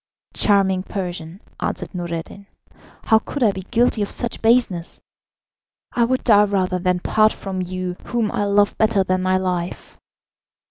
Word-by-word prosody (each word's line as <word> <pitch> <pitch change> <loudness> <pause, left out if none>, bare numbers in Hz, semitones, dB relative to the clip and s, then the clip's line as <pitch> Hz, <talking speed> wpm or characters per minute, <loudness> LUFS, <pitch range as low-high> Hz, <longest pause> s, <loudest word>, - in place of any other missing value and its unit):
"Charming 195 -2 +2
Persian," 180 -2 -6 0.2
answered - - -4
Noureddin, 175 +2 -6 0.6
"how 220 - +4
could 280 +3 -4
I 215 - +5
be 190 -1 -6
guilty 235 +2 +1
of 205 - -1
such 240 - -2
baseness? 225 -7 +1 0.9
I 235 - +2
would 255 +2 -1
die 210 -3 +6
rather 185 -2 0
than 180 0 0
part 215 +2 +3
from 190 -1 -5
you 185 0 -4
whom 235 -3 -1
I 205 - -1
love 205 0 +2
better 215 -3 +3
than 185 0 0
my 185 0 +2
life." 180 -1 -4
195 Hz, 150 wpm, -21 LUFS, 185-215 Hz, 0.9 s, die